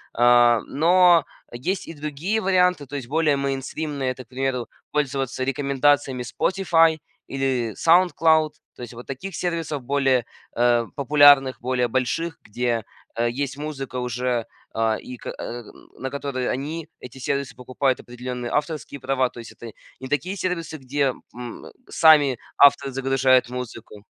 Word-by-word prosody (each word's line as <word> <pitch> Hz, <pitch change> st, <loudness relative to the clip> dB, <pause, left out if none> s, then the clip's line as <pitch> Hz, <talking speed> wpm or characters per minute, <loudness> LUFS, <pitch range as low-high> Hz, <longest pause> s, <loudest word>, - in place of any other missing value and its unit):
А, 120 Hz, -1 st, +5 dB
но 175 Hz, +2 st, +4 dB, 0.3 s
есть 180 Hz, +11 st, -3 dB
и -, -, -7 dB
другие 155 Hz, +8 st, -2 dB
варианты, 180 Hz, -5 st, +2 dB
то 145 Hz, -, -8 dB
есть 130 Hz, -4 st, -5 dB
более 150 Hz, 0 st, +2 dB
мейнстримные, 140 Hz, 0 st, -3 dB
это, 130 Hz, 0 st, -9 dB
к -, -, -46 dB
примеру, 130 Hz, -1 st, -2 dB, 0.2 s
пользоваться 135 Hz, -3 st, -1 dB
рекомендациями 135 Hz, -1 st, +1 dB
Spotify 165 Hz, +3 st, +2 dB, 0.3 s
или 130 Hz, -5 st, -1 dB
SoundCloud. 160 Hz, -3 st, +4 dB, 0.2 s
То -, -, -13 dB
есть 120 Hz, -1 st, -8 dB
вот 120 Hz, -, -10 dB
таких 160 Hz, +8 st, -6 dB
сервисов 165 Hz, -5 st, -3 dB
более, 135 Hz, -2 st, +1 dB, 0.3 s
э, 120 Hz, -1 st, +3 dB
популярных, 140 Hz, -2 st, +5 dB
более 125 Hz, 0 st, 0 dB
больших, 130 Hz, +7 st, -2 dB
где, 120 Hz, +1 st, -2 dB, 0.3 s
э, 120 Hz, +1 st, +1 dB
есть 135 Hz, +2 st, -3 dB
музыка 140 Hz, -4 st, -5 dB
уже, 125 Hz, -1 st, -2 dB, 0.3 s
э, 110 Hz, -1 st, +1 dB
и 125 Hz, -1 st, -9 dB
ка -, -, -7 dB
э, 120 Hz, 0 st, -6 dB, 0.3 s
на 130 Hz, 0 st, -5 dB
которой 140 Hz, -3 st, -3 dB
они, 150 Hz, +5 st, -4 dB
эти 125 Hz, +1 st, -11 dB
сервисы, 140 Hz, +1 st, -3 dB
покупают 130 Hz, +1 st, -1 dB
определенные 125 Hz, 0 st, -6 dB
авторские 150 Hz, -1 st, -3 dB
права. 130 Hz, -1 st, 0 dB
То -, -, -12 dB
есть 115 Hz, -, -10 dB
это 115 Hz, +1 st, -10 dB, 0.3 s
не 130 Hz, -, -7 dB
такие 170 Hz, +8 st, -2 dB
сервисы, 170 Hz, -4 st, -3 dB
где, 135 Hz, 0 st, -1 dB, 0.2 s
м, 120 Hz, -1 st, -8 dB, 0.2 s
сами 150 Hz, -5 st, +5 dB, 0.2 s
авторы 140 Hz, -1 st, +6 dB
загружают 130 Hz, -1 st, +2 dB
музыку. 115 Hz, -4 st, -8 dB
135 Hz, 145 wpm, -23 LUFS, 125-150 Hz, 0.3 s, авторы